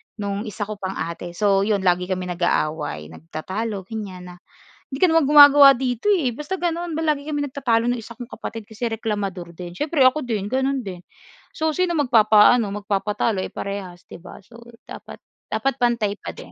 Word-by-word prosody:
no'ng 205 +1 -4
isa 210 0 -4
ko 210 0 -7
pang 190 0 -4
ate. 170 +1 -6
So 195 -1 +2
'yon 200 -2 0
lagi 180 0 +2
kami 185 -1 -2
nag-aaway 155 - -2
nagtatalo 190 - -5
ganyan 185 -4 -8
na, - - -12 0.6
"Hindi 270 - -5
ka 365 - +6
naman 325 -2 +3
gumagawa 285 -1 +9
dito 255 - 0
eh." 270 - +1
Basta 350 +7 -5
gano'n 345 -1 -2
ba - - -2
lagi 300 -3 0
kami 295 -1 -3
nagtatalo 240 -4 0
no'ng 245 - 0
isa 235 - -12
kong 240 +1 -9
kapatid 225 -4 -8
kasi 220 +2 -5
reklamador 200 -6 -4
din. 175 0 -8
Siyempre 295 - 0
ako 255 +4 +4
din, 215 -4 -3
gano'n 265 0 0
din. 185 -3 -7 0.6
So, 315 0 0
sino 360 -1 0
magpapaano, 225 -3 +5 0.2
magpapatalo 205 0 -1
eh, - - -4
parehas, 190 -3 -6
'di - - -12
ba? 175 - -11
So 235 0 -15 0.3
dapat - - -10 0.3
dapat 270 -1 -2
pantay 235 -4 +1
pa - - -8
din. - - -12
220 Hz, 185 wpm, -22 LUFS, 190-270 Hz, 0.6 s, gumagawa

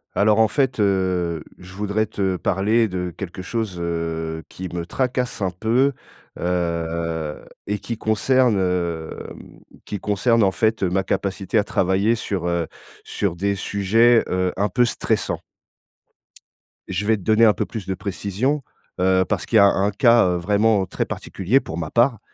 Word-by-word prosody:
Alors, 105 +1 +3
en 110 - +6
fait, 130 -1 0
heu, 90 -5 +1 0.2
je 90 +1 -12
voudrais 105 +1 -1
te 95 -3 -1
parler 105 +6 +1
de 90 -3 -4
quelque 95 -1 -7
chose, 110 -2 -3
heu, 80 -1 -3
qui 95 - -7
me 85 -1 -3
tracasse 125 +2 -1
un 95 - 0
peu, 120 +9 +1 0.5
heu, 85 -3 -2 0.3
et 105 +1 -1
qui 115 - -5
concerne, 115 +2 +2
hem, 85 -3 -4 0.3
qui 105 - -5
concerne, 115 +5 +2
en 100 - +5
fait, 110 +5 0
ma 95 0 +1
capacité 100 +3 -1
à - - +2
travailler 100 +1 +1
sur, 100 -5 -3
heu, 85 -1 0 0.4
sur 100 -5 -2
des 100 +3 0
sujets, 110 +4 +3
heu, 90 0 0
un 100 +2 +2
peu 125 - +3
stressants 120 - -1 1.5
je 95 +2 -2
vais 110 +1 +3
te - - -12
donner 110 +4 +4
un 110 - +6
peu - - -2
plus 110 -4 -7
de 95 - -1
précision, 100 +9 -2 0.4
heu, 95 0 +3
parce 105 -3 -1
qu'il 115 - +2
y - - +8
a 100 - +8
un 100 +1 +2
cas, 115 +2 +5
heu, 90 - 0
vraiment 100 +2 +2
très - - -3
particulier 100 +8 0
pour 80 - -7
ma 80 -2 -4
part. 120 -1 +3
100 Hz, 165 wpm, -22 LUFS, 90-110 Hz, 1.5 s, y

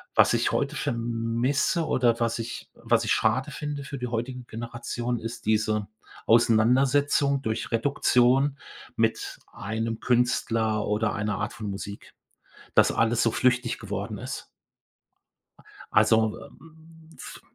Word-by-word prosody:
Was - - +5
ich - - +1
heute - - -1
vermisse 120 +7 0
oder 120 -5 +2
was 115 -1 0
ich 115 +1 -6
was - - +1
ich - - +2
schade 125 +6 +1
finde 145 -2 -5
für 140 0 -6
die 125 -1 -4
heutigen 120 +1 -4
Generationen, 120 +1 -4
ist 115 0 -7
diese 110 -1 +1 0.4
Auseinandersetzung 130 +5 +3
durch 110 -3 -3
Reduktion 130 +2 +2 0.4
mit - - -1
einem 110 +2 -3
Künstler 115 -3 +1
oder 105 +1 0
einer 105 -1 -2
Art 105 0 -3
von 105 -2 -6
Musik, 100 +1 -7 0.6
dass - - +5
alles 115 0 +2
so 115 - +2
flüchtig 125 -1 +1
geworden 105 0 -5
ist. 130 +4 -6 1.1
A - - -20 0.3
also, 110 -1 +4
ähm, 160 +1 -16
f - - -10
120 Hz, 130 wpm, -26 LUFS, 110-130 Hz, 1.1 s, Was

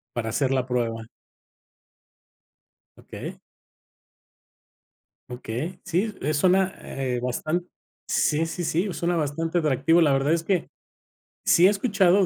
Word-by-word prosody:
Para 115 -2 -2
hacer 130 +3 0
la 130 -2 +1
prueba. 115 -3 -1 1.9
Okey. - - -8 1.9
Okey. 125 +9 -5
Sí, 190 +4 -1
eh, 150 +3 -1
suena 185 +5 +3
,eh, 130 -2 -3
bastan 155 +8 -2 0.4
sí, 155 +1 +1
sí, 165 +2 -4
sí, 175 +4 0
suena 175 +1 -1
bastante 165 +2 -1
atractivo. 155 +2 +3
La 150 -3 +4
verdad 135 +3 +2
es 170 - -1
que 180 -2 0 0.8
sí 180 +2 +6
he - - +6
escuchado 195 -3 +3
165 Hz, 120 wpm, -25 LUFS, 135-180 Hz, 1.9 s, sí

